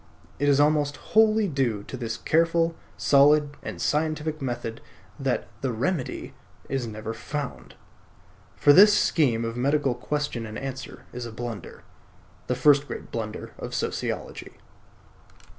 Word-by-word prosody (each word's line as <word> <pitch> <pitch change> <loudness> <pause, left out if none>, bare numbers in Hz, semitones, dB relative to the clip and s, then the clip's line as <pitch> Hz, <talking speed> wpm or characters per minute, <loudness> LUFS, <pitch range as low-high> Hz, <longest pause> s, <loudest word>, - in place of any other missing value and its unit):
It 145 +1 +2
is 140 0 +4
almost 145 -1 +2 0.2
wholly 220 -1 +5
due 130 - -1
to 130 - -8
this 115 -3 -4
careful, 165 +1 +2 0.2
solid, 145 +1 +5
and - - -6
scientific 155 0 -1
method 120 -3 -4 0.4
that - - -1
"The 135 - 0
Remedy" 130 +5 -2 0.3
is 135 -3 -2
never 110 0 -5
found. 140 +4 -6 0.8
For 145 - +6
this 205 +5 +8
scheme 120 -8 +2
of 115 0 -4
medical 140 +1 +1
question 125 -2 -3
and 110 - -7
answer 135 0 -7
is 125 -1 -5
a - - -8
blunder; 115 -4 -7 0.6
the 125 - 0
first 145 +2 +4
great - - -7
blunder 110 -2 -5
of - - -5
sociology. - - -4
140 Hz, 135 wpm, -26 LUFS, 120-150 Hz, 0.8 s, this